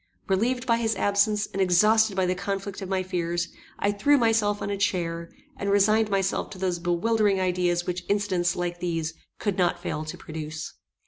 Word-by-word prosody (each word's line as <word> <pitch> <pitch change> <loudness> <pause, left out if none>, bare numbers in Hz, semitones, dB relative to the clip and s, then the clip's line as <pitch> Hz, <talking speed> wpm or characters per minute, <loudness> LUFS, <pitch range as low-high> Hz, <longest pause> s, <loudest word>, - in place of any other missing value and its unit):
Relieved 245 +6 +1
by 230 -2 +3
his 225 -1 0
absence, 205 +1 +2
and 195 - -1
exhausted 210 +3 +4
by 190 -1 +2
the 180 - +1
conflict 195 +1 -4
of 190 - -5
my 190 -1 0
fears, 175 -2 -2 0.3
I 200 - +1
threw 250 +9 +3
myself 225 -4 +2
on 200 - -3
a 200 - -2
chair, 170 -4 -1 0.3
and 200 - -2
resigned 210 +2 +4
myself 195 -1 0
to 195 - -9
those 180 -2 -1
bewildering 195 +4 +1
ideas 180 -1 +1
which 180 -1 -3
incidents 190 -4 +1
like 175 0 -3
these 165 -2 -2 0.2
could 200 -3 -2
not 175 -1 +2
fail 155 - -3
to 155 - -6
produce. 155 -1 -6
195 Hz, 185 wpm, -26 LUFS, 175-205 Hz, 0.3 s, exhausted